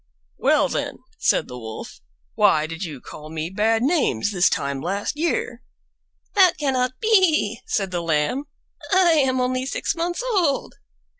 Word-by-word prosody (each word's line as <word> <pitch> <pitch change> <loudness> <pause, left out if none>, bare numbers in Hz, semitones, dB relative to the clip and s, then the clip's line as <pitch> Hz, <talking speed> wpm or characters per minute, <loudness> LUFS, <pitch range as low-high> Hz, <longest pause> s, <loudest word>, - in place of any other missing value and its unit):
"Well, - - +3
then," - - -3 0.2
said - - +2
the 125 - -8
Wolf, 110 -1 -8 0.3
"why 155 - +3
did 165 +3 -6
you 150 -7 -6
call 150 +4 -11
me 160 +2 -4
bad 225 +3 +1
names 255 - +1
this 180 -3 +3
time 140 -1 -2
last 200 - -2
year?" 295 -6 -2 0.7
"That 370 -4 +5
cannot 255 -3 -1
be," 365 - +3
said 195 -3 -1
the 175 -1 -2
Lamb; 165 - 0 0.5
"I 370 -2 +5
am 265 -5 +2
only 255 +1 -1
six - - -1
months 345 +6 -2
old." 370 - 0
250 Hz, 150 wpm, -22 LUFS, -, 0.7 s, That